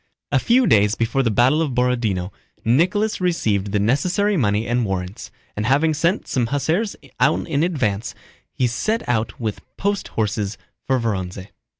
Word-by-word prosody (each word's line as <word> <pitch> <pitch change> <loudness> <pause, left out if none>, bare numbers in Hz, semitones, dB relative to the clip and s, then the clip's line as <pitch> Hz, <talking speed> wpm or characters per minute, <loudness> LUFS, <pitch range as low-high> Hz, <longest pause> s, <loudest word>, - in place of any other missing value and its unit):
A - - +3
few 250 +1 +3
days 105 - +4
before 115 +4 0
the 120 - +1
battle 125 +8 +3
of 150 -5 -1
Borodinó, 115 -7 0 0.3
Nicholas 185 - +2
received 105 - 0
the 105 - +1
necessary 175 - +1
money 105 - +1
and 120 +1 +1
warrants, 95 -2 -4 0.3
and 105 +1 -2
having 150 +4 +3
sent 170 +6 0
some 120 -3 0
hussars 160 - 0 0.2
on 140 +5 +2
in 150 -3 0
advance, 120 - -1 0.4
he 130 - 0
set 215 - -1
out 110 -2 -1
with 110 -3 -3 0.2
post 200 0 -1
horses 105 -1 -2 0.3
for 130 -1 +2
Vorónezh. 95 -4 -3
120 Hz, 160 wpm, -21 LUFS, 105-160 Hz, 0.4 s, days